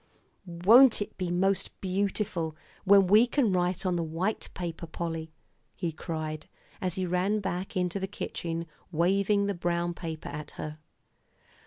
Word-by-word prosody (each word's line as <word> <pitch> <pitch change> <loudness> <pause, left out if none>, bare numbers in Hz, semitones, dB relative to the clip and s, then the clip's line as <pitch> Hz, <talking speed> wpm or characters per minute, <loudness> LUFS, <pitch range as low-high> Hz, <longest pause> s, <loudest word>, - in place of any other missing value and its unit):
"Won't 215 +9 +6
it 205 - -4
be 180 -2 -3
most 190 +2 0
beautiful 190 -4 -1 0.3
when 200 0 +7
we 210 +6 +6
can 240 -6 +2
write 180 +1 0
on 180 -1 +1
the 170 - 0
white 170 +7 -2
paper, 170 -2 -5
Polly?" 165 -1 -4 0.4
he 170 -3 -2
cried, 155 -1 -5 0.3
as 180 -2 -1
he 185 - -1
ran 180 +4 +1
back 190 -1 -3
into 180 +1 0
the 190 - -2
kitchen, 170 -4 -4 0.3
waving 195 +5 +2
the 200 - 0
brown 175 -1 -1
paper 165 -2 -6
at 150 0 -7
her. 155 0 -6
180 Hz, 150 wpm, -29 LUFS, 170-195 Hz, 0.4 s, when